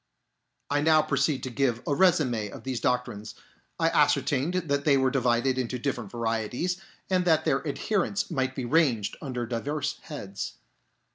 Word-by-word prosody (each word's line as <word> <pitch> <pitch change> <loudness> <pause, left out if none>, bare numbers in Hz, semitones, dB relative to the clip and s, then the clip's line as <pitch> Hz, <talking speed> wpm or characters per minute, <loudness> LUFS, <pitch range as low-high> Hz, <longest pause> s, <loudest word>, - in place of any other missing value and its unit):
I 145 0 +2
now 155 0 +5
proceed 140 -1 0
to 130 - -4
give 120 -2 0
a 145 - 0
resume 140 - +2
of - - -10
these 130 -2 -2
doctrines. 120 -4 -2 0.4
I - - +3
ascertained 145 +6 +2
that 145 -6 0
they 145 -2 +4
were 130 -1 +2
divided 125 -1 +2
[^ - - 0
into 125 0 -2
different 120 -4 -3
varieties, 115 - -2 0.3
and 185 -1 +2
that 160 -2 +3
their 135 +3 +1
adherents 200 +6 -1
might 130 -1 -1
be 130 - -3
ranged 125 -7 +2
under 125 -5 -3
diverse 145 +6 -3
heads. 100 - -6
135 Hz, 160 wpm, -27 LUFS, 120-150 Hz, 0.4 s, now